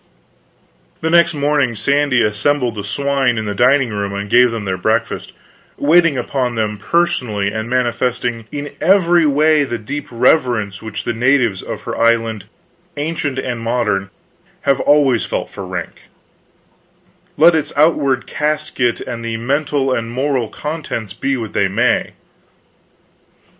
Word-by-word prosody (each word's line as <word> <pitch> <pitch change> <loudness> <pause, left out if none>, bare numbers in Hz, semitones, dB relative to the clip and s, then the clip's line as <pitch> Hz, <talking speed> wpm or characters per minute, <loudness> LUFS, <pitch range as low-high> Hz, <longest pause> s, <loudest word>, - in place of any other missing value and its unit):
The 160 - -1
next 170 -1 +4
morning 145 -4 +1
Sandy 140 +1 +2
assembled 120 +4 0
the 105 -1 -6
swine 135 +3 0
in 110 - -2
the 105 - -2
dining 125 +2 +3
room 100 -1 -3
and 100 0 -5
gave 125 0 +6
them 115 -3 -5
their 95 -1 -1
breakfast, 110 +5 -1 0.5
waiting 165 0 +3
upon 125 0 -2
them 105 -2 -2
personally 125 - 0
and 110 +2 -4
manifesting 120 -2 -1
in 145 0 -5
every 175 -2 +4
way 150 +1 +3
the 120 -4 -3
deep 140 +7 -6
reverence 120 -5 +1
which 110 -2 -6
the 120 - -2
natives 120 -4 +2
of - - -6
her - - -5
island, 115 -3 +1 0.5
ancient 145 -2 -2
and 125 -3 -3
modern, 110 -5 -1 0.5
have 140 -1 +1
always 140 -5 +3
felt - - -4
for 95 - -7
rank, 90 -2 -6 1.4
let 170 +3 +6
its 160 -2 -1
outward 145 -4 +2
casket 150 -5 -1
and 115 -1 -6
the 115 -1 -3
mental 140 +2 0
and 115 -2 -2
moral 130 -2 -1
contents 150 - -5
be 135 +3 -1
what 115 -3 -6
they 100 - +2
may. 115 +6 0
125 Hz, 140 wpm, -17 LUFS, 110-145 Hz, 1.4 s, gave